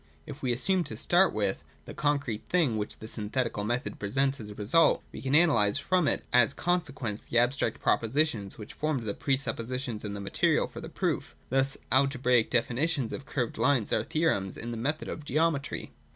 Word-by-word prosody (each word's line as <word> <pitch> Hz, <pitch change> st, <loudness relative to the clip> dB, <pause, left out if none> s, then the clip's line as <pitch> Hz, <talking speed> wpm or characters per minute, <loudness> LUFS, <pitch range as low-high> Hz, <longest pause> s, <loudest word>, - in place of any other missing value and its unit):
If 145 Hz, -1 st, -9 dB
we 130 Hz, -, 0 dB
assume, 180 Hz, +10 st, +2 dB
to -, -, -6 dB
start 175 Hz, +1 st, +4 dB
with, 100 Hz, -3 st, -1 dB, 0.2 s
the -, -, -8 dB
concrete 140 Hz, -7 st, -1 dB
thing 160 Hz, -10 st, +2 dB
which 105 Hz, -1 st, -3 dB
the 110 Hz, -, -9 dB
synthetic 115 Hz, +3 st, -1 dB
method 120 Hz, +5 st, -2 dB
presents 135 Hz, +7 st, 0 dB
as 105 Hz, -2 st, -8 dB
a 105 Hz, -, -9 dB
result, 115 Hz, +12 st, +3 dB
we -, -, -8 dB
can 135 Hz, +1 st, +1 dB
analyse 120 Hz, -11 st, +4 dB
from 180 Hz, +3 st, +1 dB
it -, -, 0 dB
as 125 Hz, +2 st, +4 dB
conse 175 Hz, -2 st, 0 dB
quences 110 Hz, -5 st, -5 dB
the 115 Hz, -, 0 dB
abstract 120 Hz, -1 st, +1 dB
propositions 115 Hz, -4 st, 0 dB
which 105 Hz, -1 st, -9 dB
formed 150 Hz, -5 st, -1 dB
the 105 Hz, -2 st, -2 dB
pre 135 Hz, +5 st, +1 dB
suppositions 125 Hz, -3 st, -3 dB
and 105 Hz, -1 st, -4 dB
the -, -, -5 dB
material 100 Hz, -, +1 dB
for -, -, -9 dB
the -, -, -7 dB
proof. -, -, -2 dB, 0.2 s
Thus, 135 Hz, +1 st, +1 dB
alge 135 Hz, +2 st, +3 dB
braical 125 Hz, -2 st, +3 dB
definitions 125 Hz, +2 st, 0 dB
of 135 Hz, -, -7 dB
curved 125 Hz, -4 st, -2 dB
lines 135 Hz, -7 st, +2 dB
are -, -, +2 dB
theorems 155 Hz, -, 0 dB
in 120 Hz, +1 st, -5 dB
the -, -, -4 dB
method 145 Hz, +7 st, -2 dB
of 155 Hz, -, -6 dB
geometry. 150 Hz, 0 st, -1 dB
130 Hz, 195 wpm, -29 LUFS, 110-145 Hz, 0.2 s, start